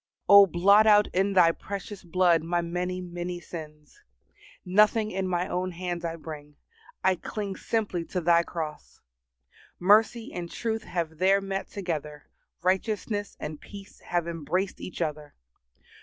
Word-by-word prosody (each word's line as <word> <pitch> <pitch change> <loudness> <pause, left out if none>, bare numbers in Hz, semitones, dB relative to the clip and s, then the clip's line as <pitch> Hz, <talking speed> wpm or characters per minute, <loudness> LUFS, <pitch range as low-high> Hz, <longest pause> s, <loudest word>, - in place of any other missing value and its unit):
O 200 0 +9
blot 200 +5 +5
out 210 -1 +6
in 195 +2 +1
Thy 175 -3 +6
precious 200 +2 -7
blood 175 -1 +3
my 170 +2 -1
many, 180 +2 -3
many 175 0 -5
sins. 155 -3 -10 0.6
Nothing 215 +3 +3
in 190 0 -2
my 180 0 -1
own 185 0 -2
hands 175 0 -4
I 165 -1 -3
bring; 150 -2 -9 0.5
I 190 - +4
cling 200 +2 -5
simply 205 -7 -2
to 180 - -3
Thy 170 0 +4
cross. 160 -3 -7 0.8
Mercy 220 +5 +3
and 175 -1 -5
truth 225 +2 -3
have 160 -3 -4
there 195 +2 +4
met 195 0 -4
together; 155 -6 -5 0.4
righteousness 205 +2 -1
and 150 -1 -6
peace 200 -1 -12
have 175 -1 -2
embraced 170 +4 -2
each 185 - -4
other. 150 -1 -5
180 Hz, 140 wpm, -27 LUFS, 170-200 Hz, 0.8 s, O